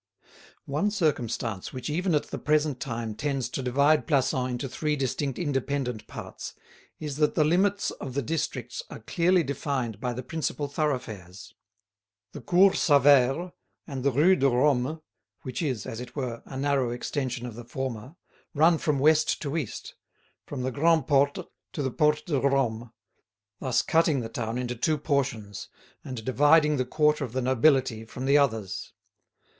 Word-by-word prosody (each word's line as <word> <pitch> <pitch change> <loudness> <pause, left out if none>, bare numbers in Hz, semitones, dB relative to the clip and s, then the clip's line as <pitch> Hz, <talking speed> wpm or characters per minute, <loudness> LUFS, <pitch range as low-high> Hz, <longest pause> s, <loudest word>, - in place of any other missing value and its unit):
One 150 +9 0
circumstance 120 - -1
which 130 -1 -6
even 175 +3 0
at 150 - -1
the - - -4
present 150 -3 +1
time 115 -5 -4
tends 135 0 -2
to 135 - -4
divide 140 +5 +2
Plassans 130 -3 +1
into 125 +2 -3
three 150 +4 -1
distinct 135 0 -2
independent 135 -6 -2
parts - - -8 0.4
is 150 -3 -5
that 150 -1 +2
the 155 - +4
limits 190 +6 +2
of 130 - -8
the 140 - 0
districts 125 -4 -3
are - - -8
clearly 175 +9 +2
defined 135 -6 -3
by 125 +1 -2
the 130 +2 -5
principal 150 +1 -3
thoroughfares. 115 - -4 0.8
The - - -9
Cours 190 +2 +4
Sauvaire 145 +3 +4 0.3
and 135 -4 -5
the 140 - +4
Rue 160 +9 +5
de 140 -5 +3
Rome, 135 +4 +1 0.4
which 130 +5 -4
is, 130 -10 -2
as 115 - -6
it 125 0 -9
were, 125 -5 -4
a 135 - -7
narrow 140 -2 +1
extension 125 0 -3
of 120 - -6
the 120 +2 -9
former, 130 +2 -5 0.4
run 160 +2 +4
from 150 -2 0
west 155 +3 +3
to 145 +1 -3
east, 150 -10 -4 0.5
from 135 -3 -4
the 130 - -1
Grand' 160 +1 +3
Porte 140 0 +2 0.3
to 145 - -2
the 130 - -1
Porte 150 +3 +2
de 145 -5 0
Rome, 125 -4 0 0.7
thus 130 -3 +1
cutting 160 -4 +2
the 115 - -5
town 115 -1 -3
into 125 -1 -2
two 155 +6 +1
portions, 135 -9 -2 0.3
and 120 -4 -7
dividing 150 +3 +4
the 130 - 0
quarter 150 +2 +2
of 125 -4 -6
the 130 - -1
nobility 130 -2 +3
from 125 +3 -7
the 140 +2 +5
others. 110 -9 -1
135 Hz, 165 wpm, -27 LUFS, 125-150 Hz, 0.8 s, Rue